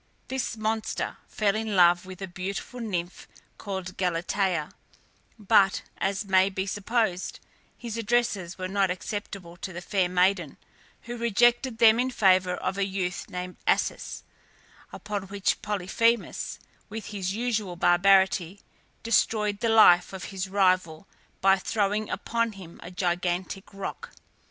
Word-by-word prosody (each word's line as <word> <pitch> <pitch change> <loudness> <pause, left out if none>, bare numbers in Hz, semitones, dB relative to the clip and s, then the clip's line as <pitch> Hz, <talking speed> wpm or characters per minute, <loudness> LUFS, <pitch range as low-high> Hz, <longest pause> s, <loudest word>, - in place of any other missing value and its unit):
This 260 -3 -3
monster 220 0 -2
fell 205 -2 0
in 220 -1 -2
love 175 0 +5
with 185 +1 -8
a - - -4
beautiful 190 +7 -5
nymph 180 -6 -4 0.3
called 190 -3 -5
Galatea; 180 -1 0 0.7
but, 195 -2 +3 0.2
as 200 +2 -1
may 190 0 +4
be 190 0 -3
supposed, 205 -2 -1 0.4
his 230 -2 -6
addresses 215 -6 0
were 185 -1 -3
not 195 0 +1
acceptable 180 -1 -5
to 190 - -6
the 175 - -6
fair 185 0 0
maiden, 180 -3 +1 0.5
who 240 - -6
rejected 240 +2 +2
them 225 0 +6
in 255 +1 +1
favour 185 -6 +3
of 195 - -3
a - - +2
youth 190 -1 -3
named 180 -1 -6
Acis, - - 0 0.7
upon 205 -2 -5
which 200 0 -1
Polyphemus, 210 +3 0 0.3
with 220 +1 -6
his 190 -1 -2
usual 215 -6 -1
barbarity, 190 +1 +3 0.4
destroyed 210 -2 +1
the 230 - 0
life 195 -5 +6
of 190 - -6
his 190 0 -3
rival 185 -4 +1 0.4
by 195 0 +5
throwing 210 +1 -1
upon 230 -1 -1
him 185 -4 -12
a 175 - -8
gigantic 180 +1 -2
rock. 195 -1 -6
195 Hz, 135 wpm, -27 LUFS, 180-215 Hz, 0.7 s, them